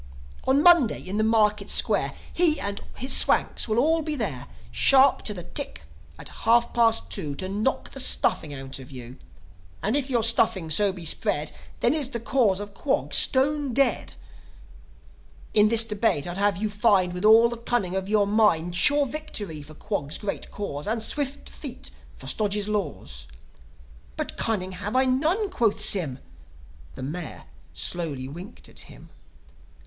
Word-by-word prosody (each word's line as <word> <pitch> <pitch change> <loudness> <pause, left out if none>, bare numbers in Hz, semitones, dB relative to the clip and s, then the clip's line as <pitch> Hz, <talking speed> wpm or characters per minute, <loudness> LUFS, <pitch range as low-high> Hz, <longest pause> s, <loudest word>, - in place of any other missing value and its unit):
"On 275 +3 +3
Monday, 340 -10 +5
in 195 +3 -4
the 215 - +1
Market 210 -2 +1
Square, - - +3 0.2
He 335 -3 +2
and 200 0 -4 0.2
his 260 +3 +2
Swanks - - +3
will 220 0 -1
all 320 +6 +2
be 305 -1 -3
there, 195 - -4 0.2
Sharp 265 - +5
to - - 0
the 180 -4 -7
tick - - -4 0.3
at - - -9
half 235 +1 +1
past 230 -1 +1
two, 150 -8 -3
To 185 - -5
knock 210 +7 -2
the 270 - -6
stuffing 160 - +3
out 135 -1 -8
of 130 - -12
you. 125 -1 -11 0.7
And 215 +6 0
if 285 -1 0
your 240 -3 +1
stuffing 205 -7 +1
so 200 +5 +3
be 180 -3 -9
spread, 150 -1 -1 0.3
Then 240 - +3
is 295 -4 +1
the 235 - -4
Cause 225 -5 +1
of 205 0 -8
Quog 270 +7 -2
stone 280 -1 +3
dead. 275 -1 0 1.4
"In 210 0 +4
this 230 0 +6
debate 210 -9 -1
I'd 175 +2 -5
have 200 -3 +1
you 215 +3 -2
find, 200 -4 +2
With 180 +2 -6
all 220 +2 +6
the 235 0 -5
cunning 230 -6 -2
of 190 0 -3
your 210 -1 +2
mind, 200 -5 +1
Sure 285 +11 +4
victory 220 - -6
for 155 +2 -12
Quog's 155 -7 -4
great 205 -2 -5
Cause, 150 -7 -6
And 220 +1 -1
swift 285 +4 -3
defeat - - -7 0.3
for - - -12
Stodge's 210 -1 0
laws." 100 - -4 0.9
"But - - -5
cunning 190 -4 -2
I - - -9
have 205 +3 -4
none," 305 +11 +1
quoth 225 - 0
Sym. 175 -11 +1 0.8
The - - -9
Mayor 155 +5 -7 0.3
slowly 150 -7 -3
winked 175 - -11
at - - -10
him. - - -15
210 Hz, 165 wpm, -24 LUFS, 180-245 Hz, 1.4 s, this